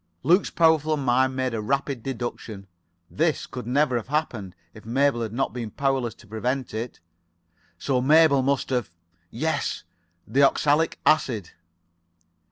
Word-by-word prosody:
Luke's 175 +8 +3
powerful 155 -2 +3
mind 130 -1 +1
made 130 -2 -1
a 110 - -2
rapid 140 +2 -1
deduction. 115 -5 -6 0.5
This 160 0 0
[Pg - - -20
80]could 125 -2 -7
never 130 0 +2
have 115 - -5
happened 120 - -3 0.2
if 110 - -13
Mabel 130 +2 +1
had 110 -2 -3
not 135 +4 -2
been 120 -3 -5
powerless 135 -3 -1
to 110 - -18
prevent 125 +4 -3
it. 115 +2 -5 0.8
So 130 +6 0
Mabel 150 0 +5
must 135 0 0
have... 125 -6 -1 0.4
Yes, 155 +4 -2 0.4
the 140 - +2
oxalic 145 +3 +3
acid. 120 - +1
130 Hz, 145 wpm, -25 LUFS, 120-145 Hz, 0.8 s, Mabel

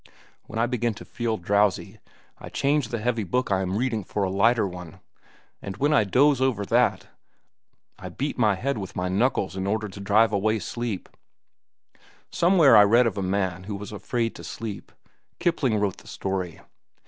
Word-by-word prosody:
"When 115 - -7
I 115 - +2
begin 120 -2 -1
to - - -11
feel 115 -2 -2
drowsy, 100 +2 0 0.4
I - - -9
change 140 -2 0
the 120 - -3
heavy 115 0 -1
book 125 +4 -1
I 95 -1 +2
am 95 +1 -2
reading 115 -3 -1
for 100 +3 -3
a 95 - -1
lighter 110 +2 +3
one. 90 -3 -9 0.6
And 95 0 -7
when 145 +5 +2
I 125 -8 +4
doze 135 +6 +3
over 120 -7 +1
that, - - +2 0.9
I - - -7
beat 145 +2 -3
my 110 -5 +2
head 130 +4 -2
with 95 -2 -7
my 90 0 -2
knuckles 100 -1 0
in 95 0 -3
order 110 +1 -1
to 100 0 -11
drive 105 +2 +3 0.3
sleep 115 -1 -4
away. - - -39 0.3
Somewhere 170 -7 +5
I 105 - +9
read 115 +4 +5
of 115 - 0
a - - -1
man 95 -1 -1
who 105 0 -4
was 105 +1 -7
afraid 115 +2 -2
to - - -10
sleep. 110 -3 -7 0.5
Kipling 155 - +1
wrote 100 -3 -1
the - - -16
story. 95 -3 -4
105 Hz, 185 wpm, -25 LUFS, 95-120 Hz, 0.9 s, I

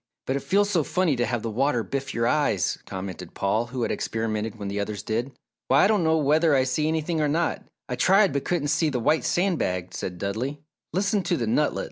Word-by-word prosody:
"But 130 - -1
it 140 - -1
feels 200 +8 +2
so 170 -6 +2
funny 180 -2 +1
to 120 -1 0
have 120 -3 -2
the 115 - -2
water 125 +1 +1
biff 135 +5 -4
your 115 -2 0
eyes," 120 - +1
commented 95 -2 -7
Paul, 105 +4 0
who 125 0 -3
had - - -1
experimented 110 0 -2
when 100 -2 -5
the 100 +1 -3
others 100 0 -3
did. 115 +5 -2 0.4
"Why, 135 +2 +5
I - - +6
don't 210 -4 +2
know 160 0 +3
whether 155 +1 +3
I 130 - +4
see 130 +4 0
anything 160 0 0
or 150 - +2
not! 165 +3 0 0.2
I - - -2
tried 195 +1 +4
but 140 - -1
couldn't 160 -5 -1
see 160 +1 +2
the 130 -4 -1
white 150 +7 +2
sand 180 -1 +1
bag," 90 0 -2
said 90 -1 -5
Dudley. 115 +10 -3 0.3
"Listen 200 +2 +1
to - - 0
the 120 - -1
nutlet!" 145 +7 +1
140 Hz, 230 wpm, -25 LUFS, 110-160 Hz, 0.4 s, I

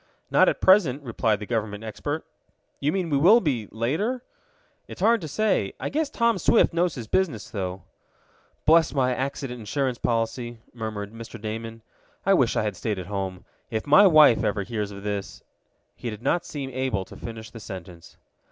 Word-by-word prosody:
"Not - - +6
at - - -3
present," 165 -8 +4
replied 115 -4 0
the 105 - -6
government 110 -2 -3
expert. 145 +8 -4 0.5
"You 145 - +1
mean 180 -2 -2
we 140 - +3
will 200 +10 +7
be 130 - -1
later?" 185 - -1 0.6
"It's - - -10
hard 225 +3 +4
to 160 - -5
say. 175 - 0
I - - -3
guess 305 0 -1
Tom 235 -6 +1
Swift - - +4
knows 170 0 +1
his 120 -4 -6
business, 145 - -1
though." 95 -3 -4 0.8
"Bless 160 0 +5
my 130 -2 +2
accident 135 -1 -4
insurance 125 +3 -2
policy!" 120 +1 -1 0.2
murmured 110 -3 -5
Mr. 115 0 -9
Damon. 115 +1 -6 0.4
"I 195 - +5
wish 130 -11 +3
I - - +1
had 105 -2 -2
stayed 105 +2 -2
home. 95 0 -4 0.2
If 110 -1 -3
my 150 +8 +7
wife 155 -8 +6
ever 105 -1 0
hears 105 -1 -3
of 100 -1 -9
this 100 -1 -4 0.3
" - - -46
He 120 - -5
did 105 +1 -8
not 175 0 +1
seem 140 -3 -5
able 125 -7 -1
to - - -13
finish 110 -1 -8
the 115 - -9
sentence. 90 -4 -10
120 Hz, 180 wpm, -25 LUFS, 105-155 Hz, 0.8 s, will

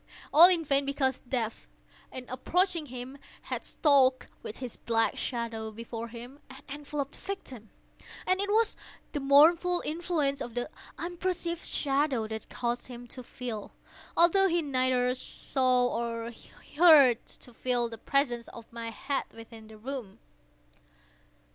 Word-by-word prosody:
All 335 +4 +10
in 340 -3 +1
vain; 275 0 +2
because 275 -2 0
Death, 230 -4 -2 0.4
in 255 -1 -7
approaching 335 +5 +1
him 255 +2 -8 0.2
had - - -4
stalked 265 -4 +3
with 215 - -8
his 250 -3 -6
black 225 -1 0
shadow 230 -3 -3
before 230 +1 -7
him, 245 +4 -10
and 265 0 -12
enveloped 285 0 -5
the - - -13
victim. 265 - -7 0.6
And 370 +1 +2
it 405 - -2
was 440 +1 +2 0.4
the 295 - -2
mournful 325 +6 +5
influence 310 -4 -1
of 235 -1 -6
the 245 +5 -3 0.3
unperceived 345 -1 -3
shadow 275 -5 0
that 220 0 -6
caused 240 0 -3
him 245 -1 -9
to 255 - -8
feel—although 255 - 0
he 340 -2 +1
neither 255 -2 +1
saw 255 -1 0
nor 230 0 -3 0.5
heard—to 275 -7 +5
feel 245 0 0
the 225 -1 -9
presence 245 -4 +1
of 230 0 -12
my 230 -1 -5
head 270 +5 -2
within 225 -1 -12
the 220 0 -13
room. 240 -3 -6
260 Hz, 135 wpm, -29 LUFS, 235-300 Hz, 0.6 s, All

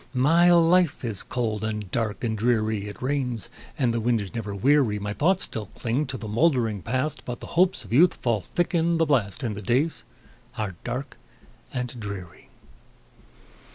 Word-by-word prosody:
My 165 +7 +5
life 170 -4 +4
is 110 -5 -3
cold, 110 -4 -2
and 105 -4 -3
dark, 110 -2 -2
and 110 -2 0
dreary; 110 -2 0
It 105 +4 -9
rains, 130 -5 -1 0.3
and 125 -5 +1
the 115 - 0
wind 115 0 +1
is 100 -1 -6
never 105 -4 -4
weary; 130 0 +3
My 100 0 -3
thoughts 180 - +2
still 110 -3 -4
cling 125 +9 -2
to 130 - -4
the 110 - -7
moldering 115 - +1
Past, 130 - -2
But 120 -1 -5
the - - -8
hopes 180 -8 +2
of 100 - -7
youth 165 +7 +6
fall 115 -4 0
thick 175 - -2
in 170 0 +2
the 165 - +3
blast, 130 -6 0
And 110 -4 -2
the 105 - -6
days 130 +10 +1 0.6
are 105 -3 -2
dark 125 +3 -5 0.5
and 125 -1 -4
dreary. 100 -5 -8
120 Hz, 180 wpm, -25 LUFS, 105-145 Hz, 0.6 s, youth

